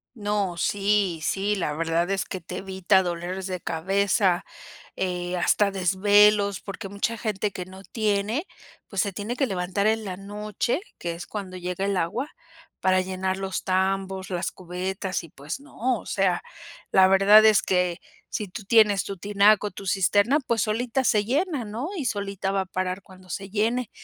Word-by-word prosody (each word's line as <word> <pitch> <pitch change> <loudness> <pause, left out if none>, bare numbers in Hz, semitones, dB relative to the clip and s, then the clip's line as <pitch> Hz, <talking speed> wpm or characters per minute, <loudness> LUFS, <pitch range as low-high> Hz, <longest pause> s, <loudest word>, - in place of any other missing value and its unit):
No, 205 -5 -1
sí, 200 -1 +1
sí, 200 +5 0
la 170 -6 -1
verdad 165 +2 0
es 195 -1 0
que 185 - -6
te 180 +2 -7
evita 190 0 +2
dolores 175 +2 -4
de 185 -1 -3
cabeza, 190 +2 +1 0.5
eh, 180 -1 -2
hasta 200 +3 +3
desvelos, 200 +2 +4
porque 195 -1 -7
mucha 200 +4 -2
gente 210 -2 -1
que 180 -2 -6
no 190 +1 -12
tiene, 215 - -1 0.4
pues, 195 - -1
se 200 - -3
tiene 210 +5 -4
que 275 - +1
levantar 190 0 -1
en 220 0 +1
la 185 -2 -5
noche, 210 - -2 0.2
que 170 -1 -3
es 170 +1 -8
cuando 195 -3 -6
llega 180 +2 -3
el 200 -1 0
agua, 235 - -1 0.5
para 185 0 +3
llenar 185 0 -2
los 195 -1 -3
tambos, 190 0 -1
las 175 -1 -2
cubetas. 185 +1 -4
Y 165 - -11
pues 145 - -7
no, 255 -4 -2
o - - -13
sea, 190 -3 +1 0.5
la 190 0 +7
verdad 195 +3 +7
es 215 -2 +6
que 180 -1 +1 0.3
si 210 - -3
tú 185 +3 -8
tienes 210 -3 +5
tu 195 - -6
tinaco, 205 +2 +3
tu 200 - -9
cisterna 205 +8 +3
pues, 230 -2 +2
solita 235 +4 0
se 210 -4 +3
llena, 285 - 0
¿no?, 230 +9 -4
y 305 -8 -3
solita 200 -3 -2
va 195 0 +1
a - - -4
parar 185 +1 -3
cuando 185 0 -17
se 195 +2 -5
llene. 225 +3 0
195 Hz, 175 wpm, -25 LUFS, 185-210 Hz, 0.5 s, la